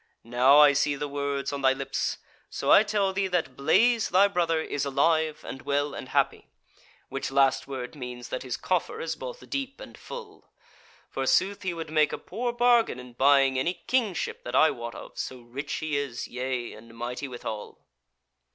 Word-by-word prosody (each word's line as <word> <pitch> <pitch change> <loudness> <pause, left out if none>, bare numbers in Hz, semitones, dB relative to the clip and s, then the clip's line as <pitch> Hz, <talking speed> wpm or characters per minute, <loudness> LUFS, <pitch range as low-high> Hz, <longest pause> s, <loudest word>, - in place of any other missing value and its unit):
Now 125 +4 +5
I 150 -1 +8
see 145 +1 +1
the 145 +1 -3
words 140 -1 -2
on 140 - -3
thy 130 0 +4
lips; 135 0 -2 0.3
so - - -1
I - - +9
tell 205 -2 0
thee 195 0 0
that 175 -8 -1
Blaise 225 - +3
thy 190 +3 +5
brother 170 -4 +1
is 145 -3 -2
alive 155 +2 +1
and 135 - -6
well 145 0 -1
and - - -7
happy; - - 0 0.6
which 135 +1 -3
last 135 -1 +2
word 130 -3 -5
means 125 -3 -7
that 130 - -3
his 130 -2 -4
coffer 185 - -1
is 485 - -3
both - - -8
deep 275 -1 -4
and - - -10
full. 460 -4 -10 0.6
Forsooth, 200 +1 +1
he 185 -4 -2
would 165 -2 -6
make 155 -1 +3
a - - -3
poor 240 +1 -3
bargain 240 - +3
in 125 -1 -11
buying 135 0 +4
any 170 +7 0
kingship 225 - -1
that 120 - -4
I 155 +3 +6
wot 120 0 -7
of, - - -10
so 130 -1 -5
rich 130 +5 -6
he 155 -2 -2
is, 140 -4 -3
yea, 125 -1 -3
and 115 +1 -14
mighty 125 +4 -4
withal." 110 -4 -6
145 Hz, 185 wpm, -27 LUFS, 130-185 Hz, 0.6 s, I